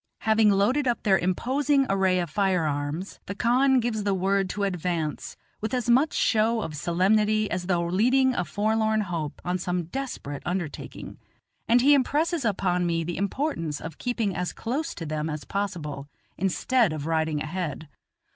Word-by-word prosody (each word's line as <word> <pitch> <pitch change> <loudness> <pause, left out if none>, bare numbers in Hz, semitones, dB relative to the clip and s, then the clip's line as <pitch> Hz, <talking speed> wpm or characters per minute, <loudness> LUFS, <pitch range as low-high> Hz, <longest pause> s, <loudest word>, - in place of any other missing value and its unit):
Having 220 -1 +4
loaded 215 +8 +2
up 240 - 0
their 190 -4 +4
imposing 270 - +1
array 190 -1 +2
of 175 - -1
firearms, 165 -2 -1
the 200 - -4
khan 255 +4 +3
gives 230 -2 -1
the 200 -1 0
word 195 +1 +1
to 200 - -3
advance, 175 -5 -2 0.2
with 220 +4 -2
as 245 -1 +1
much 275 +6 +4
show 225 0 +2
of 155 - -5
solemnity 210 +6 +2
as 180 -1 -2
though 175 -2 +1
leading 250 +9 +3
a 180 - 0
forlorn 220 +4 +1
hope 170 -7 -4
on 180 +1 -1
some 180 0 -1
desperate 170 - -5
undertaking, 175 -4 -5 0.5
and 240 +2 +5
he 285 +3 +6
impresses 300 +4 +1
upon 185 -5 +1
me 165 -1 0
the 170 +1 -4
importance 200 - -2
of 165 -2 -8
keeping 230 -6 -1
as 180 0 -2
close 290 +8 -3
to 165 - -6
then 155 0 -2
as 150 -1 -4
possible, 155 -8 -4 0.3
instead 195 +2 +1
of 150 -2 -5
riding 160 -1 0
ahead. 155 -1 -4
195 Hz, 165 wpm, -26 LUFS, 170-235 Hz, 0.5 s, he